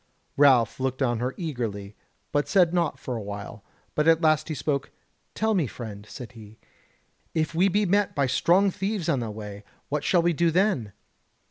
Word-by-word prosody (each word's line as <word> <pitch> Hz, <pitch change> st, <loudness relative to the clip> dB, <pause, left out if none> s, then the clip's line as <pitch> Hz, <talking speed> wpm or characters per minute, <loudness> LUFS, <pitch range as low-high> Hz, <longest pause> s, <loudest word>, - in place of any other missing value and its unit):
Ralph 130 Hz, -6 st, +4 dB
looked 130 Hz, +1 st, -1 dB
on 120 Hz, -3 st, 0 dB
her 125 Hz, +2 st, -2 dB
eagerly, 110 Hz, -, -4 dB, 0.4 s
but 145 Hz, 0 st, +1 dB
said 180 Hz, -4 st, +3 dB
naught 170 Hz, -3 st, 0 dB
for 125 Hz, -, -5 dB
a 115 Hz, -, -4 dB
while; 100 Hz, +1 st, -7 dB, 0.3 s
but 150 Hz, +1 st, +1 dB
at 165 Hz, -1 st, +6 dB
last 155 Hz, -2 st, +2 dB
he 155 Hz, -, -3 dB
spoke: 140 Hz, -1 st, -2 dB, 0.5 s
"Tell 220 Hz, 0 st, +1 dB
me, 175 Hz, -9 st, +1 dB
friend," 105 Hz, -3 st, -8 dB
said 125 Hz, -2 st, -9 dB
he, 110 Hz, -2 st, -13 dB, 0.8 s
"if 160 Hz, 0 st, 0 dB
we 180 Hz, +4 st, +3 dB
be 205 Hz, +2 st, +2 dB
met 200 Hz, +2 st, +1 dB
by 140 Hz, -2 st, +2 dB
strong 175 Hz, +9 st, +3 dB
thieves 195 Hz, -2 st, -3 dB
on 145 Hz, -6 st, +2 dB
the 115 Hz, -2 st, -3 dB
way, 105 Hz, -1 st, -8 dB, 0.3 s
what 150 Hz, 0 st, -1 dB
shall 175 Hz, +2 st, +3 dB
we 175 Hz, 0 st, +2 dB
do 170 Hz, +2 st, +2 dB
then?" 165 Hz, -, +1 dB
145 Hz, 190 wpm, -26 LUFS, 115-170 Hz, 0.8 s, at